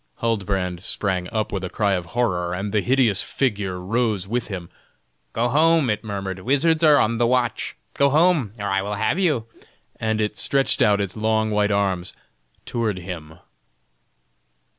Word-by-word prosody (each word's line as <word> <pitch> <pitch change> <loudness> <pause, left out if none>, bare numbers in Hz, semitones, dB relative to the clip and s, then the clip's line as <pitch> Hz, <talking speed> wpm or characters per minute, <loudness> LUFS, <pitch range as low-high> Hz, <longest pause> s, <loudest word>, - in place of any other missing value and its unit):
Huldbrand 95 -6 -1
sprang 95 -1 0
up 110 -1 -2
with 95 -2 -3
a 90 - -3
cry 100 +2 0
of 90 -2 -2
horror, 90 -7 0
and 100 +2 -4
the 105 0 +1
hideous 120 -6 +3
figure 100 -8 -2
rose 105 0 -1
with 120 +2 -2
him. 90 -5 -7 0.6
"Go 120 +2 0
home!" 155 -1 +3
it 105 - -3
murmured; 100 -3 -4
"wizards 150 - +2
are 150 -2 +7
on 115 +1 +1
the 120 - +3
watch. 125 -1 0 0.2
Go 140 0 +3
home! 155 - +3
or 100 - -5
I 95 -1 +1
will 105 +1 -3
have 110 - 0
you!" 150 -12 +1 0.5
and 110 -1 -1
it 105 -1 -1
stretched 135 -1 +1
out 105 -1 +4
its 100 -1 -4
long 110 0 0
white 105 0 +2
arms 95 -3 -1 0.5
toward 110 -5 -2
him. 85 -4 -8
105 Hz, 165 wpm, -22 LUFS, 95-120 Hz, 0.6 s, are